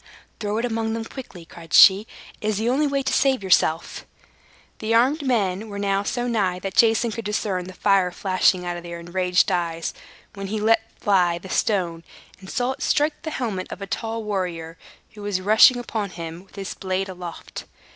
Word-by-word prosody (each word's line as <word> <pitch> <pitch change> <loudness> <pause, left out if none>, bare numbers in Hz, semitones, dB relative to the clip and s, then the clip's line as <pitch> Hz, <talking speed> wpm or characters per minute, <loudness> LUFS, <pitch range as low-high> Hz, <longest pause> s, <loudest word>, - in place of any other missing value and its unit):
"Throw 210 0 -2
it 230 - 0
among 225 -1 -1
them 225 -1 -4
quickly!" 205 -10 -10
cried 165 -1 -13
she. 200 +3 +8 0.3
"It 210 - -3
is 215 -2 0
the 220 +2 -1
only 290 +4 +2
way 275 -1 -1
to 265 - -1
save 265 -6 +2
yourself." 170 -3 +1 0.7
The 225 +1 0
armed 265 +7 +3
men 215 -6 0
were 200 - -6
now 200 -1 0
so 240 +4 -2
nigh 200 -6 0
that 190 +1 -5
Jason 225 +1 +4
could 230 +1 -5
discern 205 -3 -2
the 185 - -9
fire 195 -1 +2
flashing 185 0 +1
out 175 0 -3
of - - -7
their 170 0 -7
enraged 180 +1 +1
eyes, 165 -2 -2 0.4
when 195 -1 -6
he 215 +2 -2
let 225 +1 +2
fly 180 -4 +2
the 185 +2 -11
stone, 175 -6 0 0.4
and 190 0 -12
saw 245 +1 0
it 265 +1 -8
strike 295 +1 +1
the 315 - -4
helmet 220 -11 -3
of - - -6
a 200 - -5
tall 225 +2 -4
warrior, 175 -5 -3 0.4
who 210 - -12
was 205 -2 -1
rushing 215 +6 +6
upon 220 -4 -3
him 170 0 -8
with - - -21
his 195 -2 -5
blade 190 +1 -2
aloft. 180 -2 -8
200 Hz, 195 wpm, -23 LUFS, 180-225 Hz, 0.7 s, she